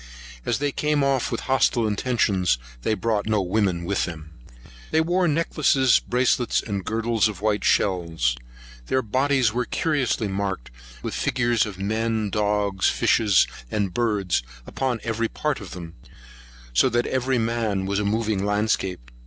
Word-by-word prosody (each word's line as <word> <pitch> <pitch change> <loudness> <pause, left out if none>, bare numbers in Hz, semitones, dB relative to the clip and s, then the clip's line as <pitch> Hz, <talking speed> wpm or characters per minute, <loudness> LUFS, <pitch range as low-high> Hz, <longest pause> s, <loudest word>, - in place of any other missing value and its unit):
As - - +1
they 145 0 -1
came 150 0 0
off 135 -2 +1
with 115 - -2
hostile 130 -3 +2
intentions, 105 - +1 0.2
they 110 - 0
brought 110 -2 -1
no 110 -1 +2
women 90 -2 0
with 100 +2 0
them. 80 -3 -8 0.6
They 160 - +2
wore 175 +3 +2
necklaces, 145 -4 +3
bracelets, 125 0 +1
and 100 -3 -4
girdles 115 +1 +1
of 105 -4 -6
white 105 0 0
shells. 85 -11 +1 0.5
Their 130 0 +1
bodies 130 0 +1
were 125 +1 0
curiously 130 -9 0
marked 95 -10 -3 0.3
with - - -3
the - - -3
figures 120 -2 +1
of 100 -3 -8
men, 110 +1 -1
dogs, 105 -2 +1
fishes, 105 -5 +3 0.2
and 100 - -1
birds, 105 - 0 0.2
upon 130 -4 -2
every 115 0 -1
part 150 +2 -2
of 100 - -8
them; 85 -2 -8 0.8
so 60 - +4
that 120 0 +1
every 130 0 0
man 110 -4 -1
was 100 +1 0
a - - 0
moving 105 -1 0
landscape. 100 - -1
110 Hz, 155 wpm, -24 LUFS, 100-125 Hz, 0.8 s, so